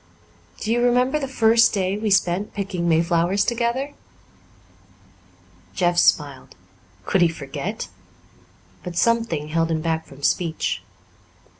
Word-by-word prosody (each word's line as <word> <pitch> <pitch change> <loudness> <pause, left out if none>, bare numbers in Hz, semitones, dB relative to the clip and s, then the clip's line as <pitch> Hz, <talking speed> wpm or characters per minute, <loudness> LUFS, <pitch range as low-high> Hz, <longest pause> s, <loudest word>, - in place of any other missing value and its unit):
Do 215 - -3
you 240 +1 +2
remember 250 +4 +2
the 275 - -3
first 230 -3 +4
day 190 0 0
we 215 +1 -2
spent 195 0 +1
picking 185 -4 -2
mayflowers 170 +4 +2
together?" 240 +4 -1 1.8
Jeff 175 -2 +2
smiled. 145 -5 +1 0.5
Could 190 - +1
he 175 - +6
forget? 160 +6 -5 0.9
But 180 -2 -7
something 225 -9 +1
held 165 +1 0
him 160 -1 -1
back 160 0 -2
from 140 +1 -15
speech. 165 0 0
185 Hz, 120 wpm, -22 LUFS, 165-230 Hz, 1.8 s, he